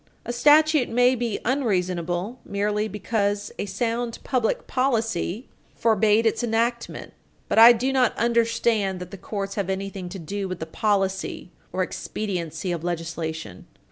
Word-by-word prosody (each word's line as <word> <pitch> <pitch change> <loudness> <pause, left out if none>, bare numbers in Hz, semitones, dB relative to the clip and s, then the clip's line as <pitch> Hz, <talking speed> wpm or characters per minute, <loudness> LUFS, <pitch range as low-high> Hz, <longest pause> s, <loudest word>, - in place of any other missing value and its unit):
A 240 - -3
statute 300 +2 +5
may 245 +2 +4
be 235 -4 -2
unreasonable 185 - -1
merely 210 +1 -1
because 205 0 -1
a - - -2
sound 230 +4 -2
public 250 -5 0
policy 230 -4 -1 0.3
forbade 220 0 +3
its 225 +2 +1
enactment. 235 +1 -1 0.3
But - - +2
I 230 +1 +11
do 250 +3 0
not 255 -3 +2
understand 230 -4 +1
that 180 -1 -8
the 195 - -7
courts 195 0 -4
have 195 - -6
anything 195 -1 -4
to 195 - -7
do 195 +4 -4
with 185 -1 -4
the 160 - -4
policy 195 0 -1 0.2
or 185 - 0
expediency 180 -4 -4
of 170 -2 -3
legislation. 165 - -4
210 Hz, 140 wpm, -24 LUFS, 185-235 Hz, 0.3 s, I